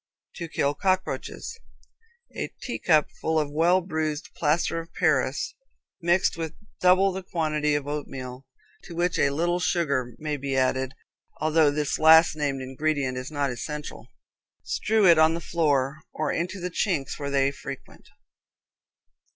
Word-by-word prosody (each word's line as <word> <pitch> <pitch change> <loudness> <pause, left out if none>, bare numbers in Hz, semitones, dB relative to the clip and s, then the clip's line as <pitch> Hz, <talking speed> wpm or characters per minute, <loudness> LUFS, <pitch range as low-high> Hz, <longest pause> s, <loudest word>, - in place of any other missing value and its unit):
To 170 - -4
Kill 145 -2 0
Cockroaches. 190 - -2 0.8
A - - -4
teacupful 160 - +1
of 150 -2 -2
well 170 +5 +3
bruised 155 -3 -3
plaster 165 +2 +1
of 165 0 -9
Paris, 150 - +1 0.5
mixed 175 +2 +2
with 165 -2 -5 0.2
double 185 +2 +5
the 190 +1 -5
quantity 155 -4 0
of 145 -1 -2
oatmeal, 135 -3 -6 0.4
to 170 - -9
which 175 +1 0
a 140 - +4
little 170 +5 0
sugar 140 -9 0
may 150 -1 -3
be 135 -1 -2
added, 130 0 0 0.4
although 155 0 +3
this 145 0 -1
last 160 +1 +7
named 140 -3 -2
ingredient 135 0 -1
is 125 +1 -5
not 145 -3 -1
essential. 150 +5 -6 0.6
Strew 215 -1 +1
it 170 -3 +7
on 160 +1 +5
the - - -3
floor, 150 -4 0
or 155 -1 -2
into 180 +4 -2
the 180 0 -4
chinks 165 -8 -1
where 140 -1 -3
they 140 0 +2
frequent. 140 -1 -10
155 Hz, 145 wpm, -26 LUFS, 140-170 Hz, 0.8 s, last